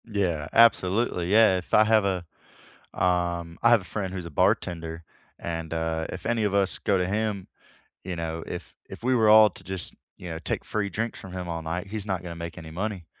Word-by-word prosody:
Yeah. 90 -9 -1
Absolutely. 100 -4 +3
Yeah. 110 -3 +6
If 90 - -8
I 110 - +7
have 110 -1 +3
a 95 -3 -1 0.7
um, 85 -2 0
I 115 - +5
have 120 -3 +6
a - - -12
friend 95 0 -4
who's 90 -2 -5
a 85 - -8
bartender, 80 +2 0 0.3
and, 80 -1 -4
uh, 80 0 -1
if 90 - -7
any 115 -1 +1
of 100 -1 +1
us 100 -1 +1
go 100 - +1
to 90 -1 0
him, 105 -1 -2 0.6
you 95 -1 -3
know, 80 0 -4
if - - -7 0.2
if - - -10
we 130 +1 +2
were 110 -3 +4
all 110 0 +8
to 95 - -15
just, 95 -1 -6 0.2
you 90 - -8
know, 80 -1 -5
take - - -3
free 105 -2 -1
drinks 115 +3 -3
from 95 -2 -10
him 90 -1 -5
all 85 -1 -3
night, 85 +4 -4
he's 105 0 -5
not 95 -4 -2
gonna 85 -2 -6
make 85 0 -6
any 80 -2 -9
money, 95 0 -4
90 Hz, 220 wpm, -26 LUFS, 85-105 Hz, 0.7 s, all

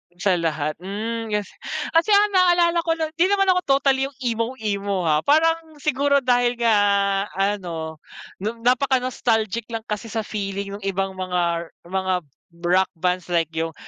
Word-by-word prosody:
Sa 180 0 +1
lahat, 155 -2 -1
hmm. 220 +4 -4
Kas 210 -1 -1 0.4
kasi 330 +6 +3
ang 415 +1 +5
naalala 350 -2 +4
ko 330 - +3
no 320 -1 -2
'di 355 - +6
naman 390 -1 +2
ako 365 - +3 0.2
totally 270 -1 +2
yung 280 - -14
emo-emo 220 -5 -1
ha. 155 -2 +3
Parang 320 +1 +2
siguro 280 -1 +2
dahil 245 -1 +3
nga 230 -2 +4 0.6
ano, 175 -6 -2 0.4
n 225 +4 -4
napaka-nostalgic 245 -4 +1
lang 225 - -2
kasi 210 0 -4
sa 225 0 -2
feeling 200 -1 -4
nung 200 - -10
ibang 195 0 -1
mga 175 -2 -1 0.2
mga 190 0 0 0.5
rock 185 +2 +3
bands 180 +1 -1
like 165 -2 +2
yung, 160 0 -3
220 Hz, 150 wpm, -22 LUFS, 185-270 Hz, 0.6 s, di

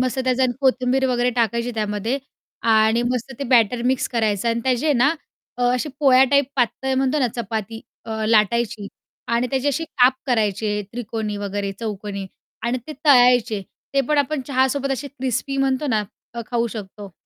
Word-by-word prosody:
मस्त 255 +1 -1
त्याच्यात 260 0 +2
आणि 245 - -4
कोथिंबीर 260 0 +2
वगैरे 245 0 +1
टाकायची 235 +1 0
त्यामध्ये 215 +4 -1 0.5
आणि 220 +2 +4
मस्त 250 +1 -2
ते 280 - -3
बॅटर 235 0 +4
मिक्स 260 0 +1
करायचं 220 -2 0
आणि 230 0 0
त्याची 260 +4 +2
ना 260 +1 +4 0.5
अ, 250 - -3
अशी 250 +4 -1
पोळ्या 265 -3 +6
टाईप 280 0 +4
पातळ 265 +2 0
म्हणतो 265 +3 +1
ना 255 - +3
चपाती 225 -1 -4 0.2
अ, 220 -1 -3
लाटायची 215 -1 +2 0.4
आणि 235 +1 +1
त्याची 270 +1 0
अशी 290 +4 -1
काप 255 -5 +3
करायचे 210 -3 0
त्रिकोणी, 220 -3 -4
वगैरे 200 0 -3
चौकोनी 205 -3 -5 0.4
आणि 240 +2 0
ते 310 - -6
तळायचे. 245 -6 +5 0.3
ते 275 - +4
पण 300 -1 +2
आपण 285 +1 0
चहासोबत 275 0 +1
असे 275 +2 -4
क्रिस्पी 265 0 -3
म्हणतो 270 +1 +1
ना 220 -6 +1 0.3
अ, 235 - -4
खाऊ 235 -1 +1
शकतो 205 -3 -8
245 Hz, 165 wpm, -21 LUFS, 220-265 Hz, 0.5 s, पोळ्या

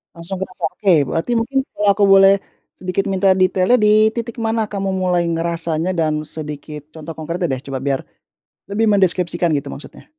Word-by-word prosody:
Langsung 170 +3 -5
kerasa? 185 0 -4
Oke, 185 -7 +2
berarti 165 +9 -2
mungkin 260 +4 0
kalau 205 0 -1
aku 200 +1 +3
boleh 195 0 +6 0.4
sedikit 185 +2 -2
minta 190 0 +3
detailnya 185 +4 +3
di 215 +1 +4
titik 235 +1 -5
mana 225 -1 -1
kamu 195 -1 -2
mulai 180 -2 +1
ngerasanya 165 0 -1
dan 155 -3 0
sedikit 150 -1 -7
contoh 160 0 -8
konkretnya 170 +1 -3
deh, 130 - -4
coba, 135 -1 -5
biar 135 -1 -1 0.7
lebih 210 +3 +1
mendeskripsikan 180 -3 +1
gitu 140 - -5
maksudnya. - - -12
185 Hz, 165 wpm, -19 LUFS, 165-200 Hz, 0.7 s, boleh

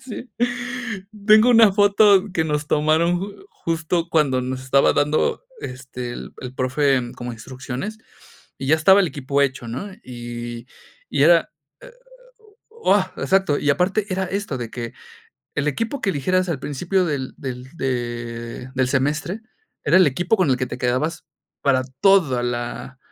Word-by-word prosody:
sí. 255 -1 -8 1.0
Tengo 215 +3 +7
una 225 -4 +7
foto 205 0 +5
que 160 -3 +1
nos 150 -1 -1
tomaron 160 +3 +2
ju 200 - -8
justo 165 - -2
cuando 140 -5 +2
nos 130 0 -4
estaba 135 +1 +4
dando, 150 - +1 0.2
este, 125 -1 -6
el - - -8
el 130 0 -7
profe 130 -1 +1
como 120 0 -5
instrucciones, 130 - -6 0.6
y 135 - -5
ya 155 - +6
estaba 190 +6 +6
el 190 - +3
equipo 140 0 -1
hecho, 130 -3 -2
¿no? 130 - -5 0.2
Y 120 -1 -7 0.4
y - - +1
era, - - +5 0.3
e - - -13 0.8
o, 455 0 +2
ah, - - +1
exacto. 190 -7 +2
Y 145 - -2
aparte 190 +8 +1
era 190 +1 0
esto, 195 -8 -3
de 120 -2 -5
que 120 -1 -6 0.6
el 150 +1 +1
equipo 230 - -2
que 200 - +1
eligieras 185 +5 0
al 155 - -1
principio 180 +6 0
del 140 -4 -3
del 130 -1 -6
de 120 -1 -4
del 130 -1 +1
semestre 145 - -1 0.4
era - - +4
el 185 - +6
equipo 175 - +1
con 180 -7 +2
el 130 - +3
que 130 - -1
te 125 - -7
quedabas 130 +8 -1 0.4
para 135 -2 +3 0.2
toda 170 -11 +4
la 120 +1 -4
145 Hz, 160 wpm, -22 LUFS, 125-190 Hz, 1.0 s, Tengo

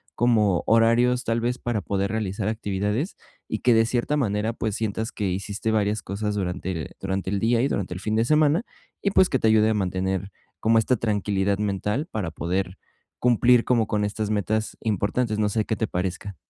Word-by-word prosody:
como 110 -6 +2
horarios, 120 +2 +4
tal 115 0 0
vez 120 +2 -1
para 120 -5 -2
poder 100 0 -1
realizar 105 -2 -2
actividades, 105 - -2 0.3
y 110 - -3
que 125 - +4
de 115 0 +4
cierta 125 +5 0
manera, 110 -3 0
pues, 110 -3 -3
sientas 110 +1 -2
que 100 -3 -2
hiciste 100 +4 -2
varias 105 -1 +1
cosas 105 +2 -3
durante 90 -4 -3
durante 95 0 -2
el 100 - 0
día, 115 +2 +2
y 135 - +1
durante 90 -2 -2
el 90 - -7
fin 110 +2 -1
de 115 - +2
semana. 155 - +3 0.4
Y 200 - +1
pues 185 -1 +4
que 130 - +1
te 115 - +2
ayude 110 0 +4
a - - +2
mantener 95 0 -2 0.3
como 115 +1 +3
esta 125 +3 +1
tranquilidad 100 -2 0
mental 105 - -1
para 95 -7 -3
poder 90 +3 -2 0.4
cumplir 120 0 +4
como 120 -3 +2
con 105 -1 0
estas 105 +1 -3
metas 110 +1 -1
importantes. 110 +2 0
No 105 -1 +2
sé 110 +1 0
qué 110 - -1
te 110 - -1
parezca. 95 +2 -3
110 Hz, 195 wpm, -24 LUFS, 100-115 Hz, 0.4 s, horarios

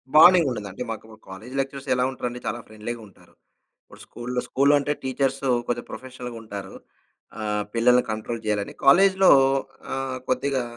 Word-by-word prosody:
బాండింగుండదండి. 155 - +6
అంటే 100 - -5
మాకు 110 - -7
మా 110 - -12
కాలేజి 110 +8 -9
లెక్చరర్స్ 135 0 -4
ఎలా 125 - +1
ఉంటారండి 125 -1 -5
చాలా 120 - -2
ఫ్రెండ్‌లీగా 110 +2 -7
ఉంటారు. 100 - -22 0.7
స్కూలులో, 125 +1 -4
స్కూలులో 140 +2 +3
అంటే 145 +1 -1
టీచర్స్ 135 +1 -1 0.2
కొంచెం 120 0 -2
ప్రొఫెషనల్‌గుంటారు. 120 -6 -8 0.6
ఆహ్, 105 -1 -1
పిల్లల్ని 125 +2 +4
కంట్రోల్ 110 +1 -4
జేయాలని. 105 -1 -1
కాలేజిలో 190 +6 +6 0.6
ఆహ్, 135 -1 -3
కొద్దిగా 135 -1 0
125 Hz, 135 wpm, -24 LUFS, 110-135 Hz, 0.7 s, బాండింగుండదండి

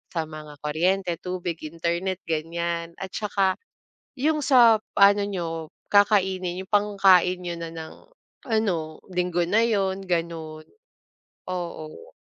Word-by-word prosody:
sa 165 - +1
mga 155 -1 -9
kuryente, 175 +5 +1
tubig, 180 -2 -4
internet 170 +4 -2
ganyan 170 +1 -2
at 190 - -4
saka, 200 -3 0 0.6
yung 305 +2 +1
sa 245 -4 +7 0.2
pa 200 0 +6
ano 205 - 0
niyo 190 -4 -3 0.4
kakainin 190 -3 +2
yung - - -57
pangkain 195 -3 +4
niyo 175 -1 -4
na 165 -1 -6
ng 160 -1 -8 0.6
ano, 170 -8 0
linggo 180 -1 0
na 220 +5 +3
yun 195 -4 0
gano'n. 165 -3 -3 0.8
Oo. 175 - -6
180 Hz, 120 wpm, -25 LUFS, 170-200 Hz, 0.8 s, sa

